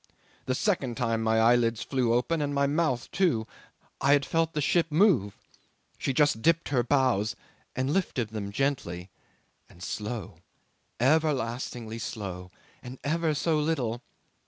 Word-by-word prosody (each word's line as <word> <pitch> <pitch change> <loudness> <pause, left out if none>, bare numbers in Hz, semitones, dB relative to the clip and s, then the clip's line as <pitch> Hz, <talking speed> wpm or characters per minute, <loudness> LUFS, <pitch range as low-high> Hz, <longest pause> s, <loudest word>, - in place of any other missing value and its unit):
The 130 - +1
second 135 - 0
time 115 -3 0
my 110 0 +2
eyelids 115 0 +3
flew 130 -4 0
open 125 +7 +1
and 145 -1 -1
my 140 0 +3
mouth 140 -4 0
too. 170 -13 +1 0.6
I 140 +1 +5
had 140 -1 +3
felt 165 0 0
the 150 - -1
ship 165 +3 +2
move. 155 - +3 0.6
She - - 0
just 145 -4 +2
dipped 165 +5 +2
her 130 -4 +2
bows 120 -4 +1 0.4
and 130 +3 0
lifted 135 - -1
them 105 -2 -5
gently 100 -8 -2 0.6
and 85 - -14
slow! 110 +2 -5 0.6
everlastingly 125 -5 0
slow; 95 -6 -6 0.3
and 125 +1 -9
ever 160 +1 0
so 155 +1 +1
little. 130 -7 -1
130 Hz, 140 wpm, -28 LUFS, 115-150 Hz, 0.6 s, I